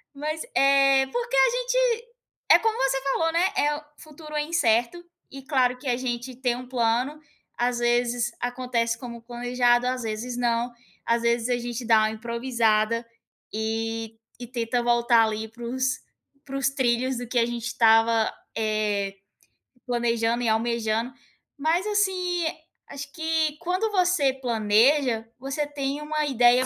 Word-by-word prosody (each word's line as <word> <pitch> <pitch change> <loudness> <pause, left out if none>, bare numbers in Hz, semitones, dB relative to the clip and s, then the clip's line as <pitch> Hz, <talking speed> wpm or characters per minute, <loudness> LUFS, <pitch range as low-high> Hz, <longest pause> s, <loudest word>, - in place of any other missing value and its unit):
Mas, 305 +2 -3
eh, 275 -1 +5
porque 485 +1 -2
a - - +6
gente - - -1 0.7
é - - +9
como 450 0 0
você 270 0 +1
falou, 325 +4 0
né, 340 +2 +3
eh, 295 -2 +2
o 305 - -11 0.2
futuro 305 0 -11
é 300 - +1
incerto 290 0 +1 0.3
e 270 0 -9
claro 255 -3 +2
que 275 - -10
a 245 -1 +1
gente 250 0 -4
tem 250 -1 0
um 250 0 -8
plano, 250 +4 0 0.4
às 245 0 0
vezes 240 0 +1
acontece 245 -2 -1
como 235 -2 -8
planejado, 245 0 +1
às 255 -1 -2
vezes 225 +3 -4
não. 240 0 0 0.3
Às 235 0 +1
vezes 235 +1 +1
a 245 - +2
gente 240 0 -5
dá 225 -1 +5
uma 215 0 +1
improvisada 230 -1 0 0.5
e 225 0 -3 0.2
e 245 - -6
tenta 240 0 -1
voltar 235 -1 +4
ali 220 0 -3
para 235 +1 -12
os 255 +1 -1 0.5
para 275 0 -5
os 270 - +2
trilhos 255 -1 0
do 245 -1 -5
que 245 0 +1
a 230 - +3
gente 240 -1 -4
estava, 225 -1 +4 0.3
eh, 210 -2 -1 0.7
planejando 235 0 0
e 225 - +1
almejando. 230 +1 0 0.4
Mas, 330 +7 +1
assim, 365 -4 0 0.4
acho 280 0 -8
que 320 -2 0
quando 370 +5 -1
você 355 -8 +2
planeja, 235 0 +2
você 275 +3 -2
tem 285 0 -3
uma 305 0 -1
ideia 250 -1 +4
245 Hz, 155 wpm, -25 LUFS, 235-280 Hz, 0.7 s, é